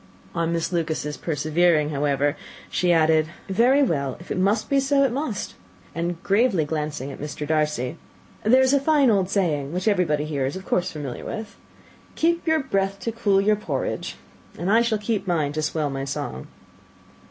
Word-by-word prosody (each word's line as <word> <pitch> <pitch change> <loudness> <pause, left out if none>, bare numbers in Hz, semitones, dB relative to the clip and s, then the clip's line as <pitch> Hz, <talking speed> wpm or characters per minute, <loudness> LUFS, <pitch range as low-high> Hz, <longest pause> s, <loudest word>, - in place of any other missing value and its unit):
On 170 -1 0
Miss 170 +1 -1
Lucas's 155 -3 -1
persevering, 155 0 +1
however, 145 0 +1 0.4
she 180 -1 +2
added, 160 -1 +4 0.2
"Very 245 +8 +4
well; 140 - -1
if 175 - -11
it - - -1
must 200 +4 +1
be 275 - +3
so, 275 +1 +3
it 270 - +2
must." 255 -6 -3 0.4
And 170 0 -3
gravely 200 -5 +2
glancing 150 -2 -3
at - - -10
Mr. 150 0 -5
Darcy, 150 -4 0 0.5
"There 255 +5 +5
is 260 +1 +3
a - - +6
very 275 - -4
fine 290 -6 +4
old 190 -3 +2
saying, 155 -8 0
which 180 +3 -2
everybody 170 -8 +2
here 140 -4 -1
is 140 - -4
of 190 0 -7
course 180 +1 0
familiar 145 -5 -6
with 220 0 -6 0.6
'Keep 340 +1 +1
your 320 -1 +3
breath 195 -6 0
to 230 - -2
cool 205 -4 +2
your 210 +2 +3
porridge,' 210 - -3 0.4
and 180 +3 -1
I 225 +2 +5
shall 230 -2 +1
keep 210 -1 -2
mine 155 -5 0
to 155 - -1
swell 150 -1 -1
my 135 0 -3
song." 65 - -5
175 Hz, 185 wpm, -24 LUFS, 150-220 Hz, 0.6 s, a